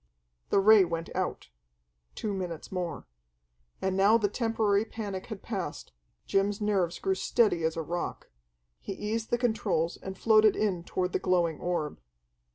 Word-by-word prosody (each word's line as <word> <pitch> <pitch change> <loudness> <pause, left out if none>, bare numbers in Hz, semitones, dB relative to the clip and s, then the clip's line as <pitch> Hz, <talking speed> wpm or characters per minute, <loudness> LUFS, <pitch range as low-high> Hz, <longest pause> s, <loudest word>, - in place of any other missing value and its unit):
The - - +4
ray 210 0 +7
went 165 -1 -4
out. - - -3 0.7
Two 210 -2 -3
minutes 180 -4 -5
more. 180 -2 -4 0.8
And 190 0 +1
now 200 +4 +5
the 210 -3 +1
temporary 220 -2 +1
panic 205 -4 -6
had 215 -4 -7
passed; 190 -9 -5 0.3
Jim's 200 +1 +1
nerves 195 -5 0
grew 190 - 0
steady 190 -2 +2
as 160 +1 0
a 165 - -1
rock. 175 +3 -4 0.5
He 195 - -5
eased 220 +3 -3
the 240 - +2
controls 220 -8 0
and 190 0 -7
floated 215 -1 +5
in 190 -5 0
toward 180 0 -2
the - - +1
glowing 175 -4 +1
orb. 165 - -2
195 Hz, 155 wpm, -29 LUFS, 175-215 Hz, 0.8 s, ray